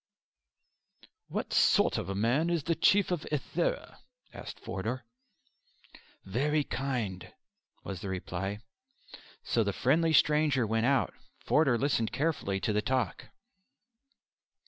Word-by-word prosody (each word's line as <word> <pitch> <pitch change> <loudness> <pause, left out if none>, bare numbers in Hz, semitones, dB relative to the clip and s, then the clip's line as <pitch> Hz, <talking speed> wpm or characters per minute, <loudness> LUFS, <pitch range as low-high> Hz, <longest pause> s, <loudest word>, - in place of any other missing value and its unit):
"What - - -4
sort - - +4
of - - -5
a 100 - -2
man 120 - +1
is 170 -4 0
the 165 - +1
Chief 195 +4 +3
of 175 -4 0
Ithera?" - - -2 0.3
asked - - -9
Forder. 115 +6 -4 1.2
"Very 145 +9 +1
kind," 120 -11 -3 0.5
was 95 -3 -6
the 100 - -5
reply. 95 +2 -4 0.8
So - - +1
the - - -1
friendly 165 0 +2
stranger 150 -5 +3
went 115 +2 +1
out. 140 -1 +2 0.3
Forder 140 -6 +3
listened 120 -4 0
carefully 140 -11 -1
to 105 - 0
the 105 - +1
talk. 130 +3 -1
130 Hz, 120 wpm, -30 LUFS, 105-155 Hz, 1.2 s, sort